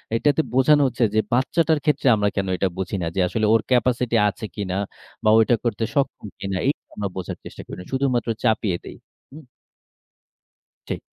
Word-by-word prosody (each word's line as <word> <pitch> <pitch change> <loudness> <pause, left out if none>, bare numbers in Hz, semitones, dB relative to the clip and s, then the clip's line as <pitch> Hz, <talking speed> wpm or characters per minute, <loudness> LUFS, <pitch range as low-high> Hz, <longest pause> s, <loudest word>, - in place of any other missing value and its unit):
এটাতে 145 +6 +2
বোঝানো 145 +3 +5
হচ্ছে 125 - -1
যে - - +4
বাচ্চাটার 155 +5 +2
ক্ষেত্রে 150 -3 +1
আমরা 105 -1 +1
কেন 95 -1 -1
এটা 95 - +1
বুঝি 95 +1 -3
না? 85 - -1
যে - - -1
আসলে 110 +4 0
ওর 115 - +4
capacity 125 -1 +2
আছে 110 +2 -7
কিনা 95 -3 -3 0.5
বা, 110 - +4
ও - - +6
এটা 120 - +3
করতে 115 -1 -1
সক্ষম 135 -6 -1
কিনা? 95 -1 -3
এই 140 - +5
কেন - - -65
আমরা 100 -2 -2
বোঝার 95 -2 -5
চেষ্টা - - -9
করি - - -8
না। 90 - -9
শুধুমাত্র 130 -3 0
চাপিয়ে 105 -5 +1
দেই। - - -9 0.3
হু? 145 - -11 1.5
ঠিক। - - -3
115 Hz, 190 wpm, -23 LUFS, 100-130 Hz, 1.5 s, ও